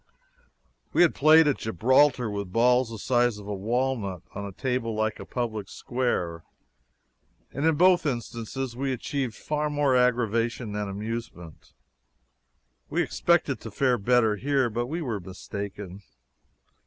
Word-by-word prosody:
We -, -, +5 dB
had 170 Hz, -, +3 dB
played 155 Hz, +2 st, +6 dB
at 145 Hz, -, +1 dB
Gibraltar 125 Hz, -, +3 dB
with 100 Hz, -3 st, -4 dB
balls 125 Hz, +3 st, +3 dB
the 115 Hz, -, -7 dB
size 120 Hz, 0 st, +1 dB
of 105 Hz, -, -10 dB
a 105 Hz, -, -3 dB
walnut, 110 Hz, -3 st, -2 dB
on 100 Hz, 0 st, -5 dB
a -, -, -7 dB
table 125 Hz, 0 st, -2 dB
like 110 Hz, 0 st, -1 dB
a -, -, -9 dB
public 110 Hz, -5 st, -3 dB
square 90 Hz, -10 st, -2 dB, 1.1 s
and 140 Hz, +4 st, -1 dB
in 160 Hz, -, +3 dB
both 180 Hz, 0 st, +4 dB
instances 120 Hz, 0 st, -4 dB
we 135 Hz, +1 st, -1 dB
achieved 130 Hz, -2 st, -3 dB
far 150 Hz, 0 st, -2 dB
more 145 Hz, -3 st, +2 dB
aggravation 120 Hz, -2 st, +1 dB
than 105 Hz, -1 st, -3 dB
amusement. 105 Hz, -5 st, -7 dB, 1.2 s
We -, -, +1 dB
expected -, -, +1 dB
to -, -, -7 dB
fare 125 Hz, -3 st, +1 dB
better 110 Hz, 0 st, +3 dB
here, 135 Hz, -1 st, +1 dB
but 120 Hz, +2 st, -2 dB
we 165 Hz, +5 st, -3 dB
were 115 Hz, -7 st, -3 dB
mistaken. 95 Hz, +1 st, -7 dB
120 Hz, 140 wpm, -26 LUFS, 105-130 Hz, 1.2 s, played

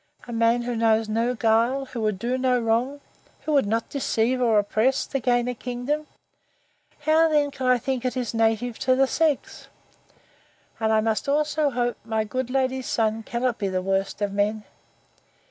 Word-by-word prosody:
—A 240 Hz, -, -6 dB
man 230 Hz, +1 st, +2 dB
who 240 Hz, 0 st, -3 dB
knows 225 Hz, -1 st, +2 dB
no 230 Hz, +3 st, 0 dB
guile! 230 Hz, +4 st, +2 dB
who 245 Hz, -3 st, -6 dB
would 215 Hz, -3 st, 0 dB
do 240 Hz, +6 st, -1 dB
no 255 Hz, -1 st, +1 dB
wrong!—who 250 Hz, +6 st, -3 dB
would 275 Hz, -7 st, +3 dB
not 225 Hz, +2 st, -1 dB
deceive 255 Hz, -2 st, 0 dB
or 230 Hz, -3 st, +3 dB
oppress, 220 Hz, +6 st, +1 dB
to 275 Hz, -, -3 dB
gain 245 Hz, 0 st, +1 dB
a 250 Hz, -, -1 dB
kingdom!—How 295 Hz, +4 st, -3 dB
then 295 Hz, -2 st, +2 dB
can 260 Hz, -2 st, -4 dB
I 250 Hz, 0 st, +5 dB
think 255 Hz, +1 st, -3 dB
it 255 Hz, 0 st, -2 dB
is 245 Hz, -3 st, -2 dB
native 225 Hz, +1 st, 0 dB
to 255 Hz, -, +2 dB
the 270 Hz, +1 st, +4 dB
sex? 300 Hz, +1 st, -1 dB, 1.1 s
And 220 Hz, -1 st, +1 dB
I 220 Hz, 0 st, +3 dB
must 220 Hz, +4 st, -1 dB
also 300 Hz, +1 st, +1 dB
hope 245 Hz, -2 st, -1 dB
my 220 Hz, -1 st, -1 dB
good 255 Hz, +3 st, -3 dB
lady's 260 Hz, 0 st, -1 dB
son 220 Hz, -1 st, 0 dB
cannot 240 Hz, +1 st, -2 dB
be 200 Hz, -, -1 dB
the 185 Hz, -1 st, -2 dB
worst 195 Hz, +2 st, -1 dB
of 200 Hz, -1 st, -1 dB
men! 210 Hz, +1 st, 0 dB
240 Hz, 175 wpm, -24 LUFS, 220-260 Hz, 1.1 s, I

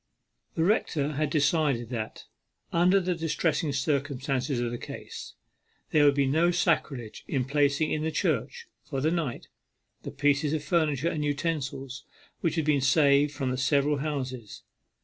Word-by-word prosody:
The 160 Hz, -, +1 dB
rector 160 Hz, -6 st, +1 dB
had 150 Hz, 0 st, -1 dB
decided 145 Hz, -5 st, +1 dB
that, 110 Hz, -3 st, -5 dB, 0.5 s
under 180 Hz, +3 st, +4 dB
the 180 Hz, -1 st, -1 dB
distressing 165 Hz, -2 st, 0 dB
circumstances 140 Hz, -2 st, -1 dB
of 120 Hz, -1 st, -1 dB
the 120 Hz, -, -5 dB
case, -, -, -8 dB, 0.6 s
there 150 Hz, -1 st, +5 dB
would 140 Hz, -1 st, +5 dB
be 140 Hz, -1 st, +2 dB
no 160 Hz, +6 st, +3 dB
sacrilege 145 Hz, -10 st, -1 dB
in 130 Hz, -4 st, -1 dB
placing 145 Hz, +2 st, +1 dB
in 155 Hz, -, 0 dB
the 160 Hz, -, 0 dB
church, 465 Hz, -, -1 dB, 0.2 s
for 135 Hz, -, -4 dB
the 155 Hz, +4 st, +1 dB
night, 160 Hz, -8 st, -3 dB, 0.5 s
the -, -, -6 dB
pieces 145 Hz, +1 st, +1 dB
of 155 Hz, -2 st, -1 dB
furniture 155 Hz, -1 st, +1 dB
and 150 Hz, -3 st, -2 dB
utensils 140 Hz, -3 st, -3 dB, 0.4 s
which 165 Hz, -, 0 dB
had 160 Hz, -3 st, 0 dB
been 150 Hz, -3 st, +2 dB
saved 140 Hz, +1 st, +4 dB
from 135 Hz, -3 st, -2 dB
the 130 Hz, -, -2 dB
several 140 Hz, +2 st, +2 dB
houses. 130 Hz, -6 st, -5 dB
145 Hz, 155 wpm, -27 LUFS, 135-160 Hz, 0.6 s, there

